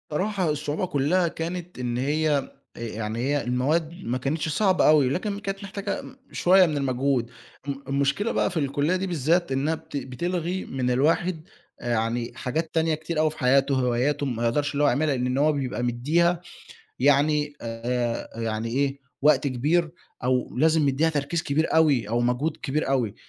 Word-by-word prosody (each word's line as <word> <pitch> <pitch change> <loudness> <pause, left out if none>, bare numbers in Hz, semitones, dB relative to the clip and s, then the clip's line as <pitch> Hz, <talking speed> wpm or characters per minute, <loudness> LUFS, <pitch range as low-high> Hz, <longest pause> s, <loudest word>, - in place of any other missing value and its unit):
صراحة 185 +2 0
الصعوبة 150 +3 -1
كلّها 170 +3 +1
كانت 170 0 -5
إن 120 -1 -2
هي 145 +1 0 0.2
يعني 110 -1 -4
هي 140 +3 +1
المواد 150 +7 0
ما 125 +2 -1
كانتش 150 +5 -2
صعبة 190 +3 +3
أوي، 150 -4 +5
لكن 200 +8 -2
كانت 195 -1 -5
محتاجة 200 +1 -4 0.3
شوية 185 +1 +5
من 155 -4 -1
المجهود 130 -2 0 0.4
م 140 - 0
المشكلة 140 +10 0
بقى - - +1
في - - -5
الكلية 145 +3 +1
دي 190 +1 -2
بالذات، 170 0 +1
إنها 140 +5 +1
بت 160 -2 -7
بتلغي 175 +7 -3
من 130 -1 -1
الواحد 160 +6 +1 0.4
يعني 115 0 -1
حاجات 160 +6 -3
تانية 160 -1 +2
كتير 155 +1 -4
أوي 155 0 +3
في 155 - -12
حياتُه، 135 +1 +3
وهواياته 130 +3 +1
ما 120 -3 -2
يقدرش 145 +5 0
اللي 145 +1 +1
هو - - +5
يعملها 140 +2 +2
لإن 125 -1 -1
إن 125 +1 -1
هو 150 +2 +4
بيبقى 135 -4 -2
مدّيها 160 +9 +1 0.6
يعني 145 +2 +3
آآ، 115 0 -3
يعني 110 0 -2
إيه، 135 +3 0 0.2
وقت 145 -1 +4
كبير 150 +6 +1 0.3
أو 125 0 +1
لازم 155 +1 +3
يدّيها 145 +4 +2
تركيز 150 +2 -1
كبير 155 +3 0
أوي، 145 -9 +3
أو 120 +2 0
مجهود 125 +6 0
كبير 155 -1 -1
أوي، 125 -7 0
145 Hz, 170 wpm, -25 LUFS, 125-160 Hz, 0.6 s, أوي